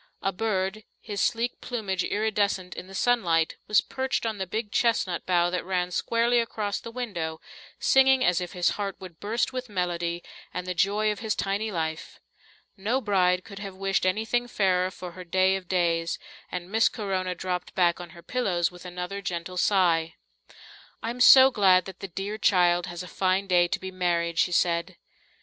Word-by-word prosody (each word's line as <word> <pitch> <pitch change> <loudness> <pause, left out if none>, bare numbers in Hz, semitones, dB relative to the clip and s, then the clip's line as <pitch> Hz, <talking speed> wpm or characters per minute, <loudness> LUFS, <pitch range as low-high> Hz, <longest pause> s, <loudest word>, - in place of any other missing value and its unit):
A 195 - +1
bird, 195 0 -2 0.2
his 205 -2 -4
sleek 235 +1 0
plumage 200 -7 -2
iridescent 205 -4 0
in 180 - -8
the 195 - -10
sunlight, 175 -9 +2
was 210 -3 +4
perched 265 +2 -2
on 220 -3 -2
the 190 - -3
big 210 +2 -3
chestnut 225 -7 +1
bough 175 -1 +3
that 180 - -2
ran 180 -1 -1
squarely 235 +5 +2
across 215 -3 -2
the - - -9
window, 195 -10 -4 0.4
singing 265 -1 +4
as 180 0 +2
if 180 - -5
his 180 -1 +2
heart 195 -1 -3
would 180 -4 -11
burst 230 +5 -1
with 255 -1 -5
melody 175 -3 -2 0.3
and 180 - -3
the 180 - -2
joy 205 +4 +2
of 210 - -5
his 220 -2 -1
tiny 205 +2 -1
life. 160 -3 -4 0.6
No 215 +6 0
bride 185 -5 +2
could 200 -1 -10
have 195 -2 -7
wished 195 0 0
anything 225 +5 0
fairer 185 -4 +1
for 180 -1 -8
her 185 +1 -9
day 185 +2 +2
of 190 -2 -6
days, 170 -2 0 0.3
and 180 +1 -5
Miss 225 +1 +4
Corona 190 -3 -2
dropped 180 0 -4
back 175 -1 +2
on 175 - -9
her 170 - -13
pillows 185 -10 0
with 180 0 -13
another 180 +2 -5
gentle 180 -1 -4
sigh. 170 -4 +2 0.9
"I'm 235 +2 -3
so 265 +1 +9
glad 185 -5 +4
that 190 -1 -9
the 195 - -5
dear 195 +4 -5
child 175 -3 +3
has 175 +1 -6
a - - -9
fine 185 +2 0
day 175 -2 +3
to - - -2
be 190 0 -6
married," 170 -2 0
she 180 - +3
said. 170 +1 +1
190 Hz, 185 wpm, -26 LUFS, 180-215 Hz, 0.9 s, so